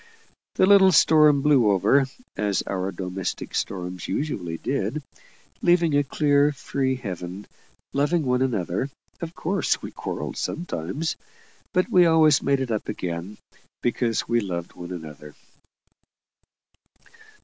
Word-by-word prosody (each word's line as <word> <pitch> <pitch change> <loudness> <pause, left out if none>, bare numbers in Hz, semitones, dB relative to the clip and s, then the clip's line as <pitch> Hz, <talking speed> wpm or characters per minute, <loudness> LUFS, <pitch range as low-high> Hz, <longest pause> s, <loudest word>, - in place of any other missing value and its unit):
The - - +4
little 190 -1 +7
storm 150 -3 +5
blew 135 -7 +4
over, 130 +8 +3 0.3
as 105 -2 0
our 95 0 -3
domestic 95 0 -5
storms 90 -1 -3
usually 90 - -3
did, 135 - -2 0.6
leaving 175 -3 +3
a 145 - +4
clear, 145 +1 +2
free 135 -1 -2
heaven. 95 -4 -6 0.5
Loving 150 +3 +1
one 125 0 +1
another, 110 -1 -1 0.3
of 170 0 -6
course 190 +5 0
we - - -6
quarrelled - - -5
sometimes; 155 - -3 0.5
but 185 -2 +1
we 180 -2 +6
always 160 -3 +5
made 140 -1 +1
it 130 -3 -3
up 110 - -2
again, 90 +3 -5 0.5
because 120 -2 0
we 120 0 +2
loved 85 -4 -5
one 90 0 -9
another. 75 -4 -9
130 Hz, 125 wpm, -24 LUFS, 95-150 Hz, 0.6 s, little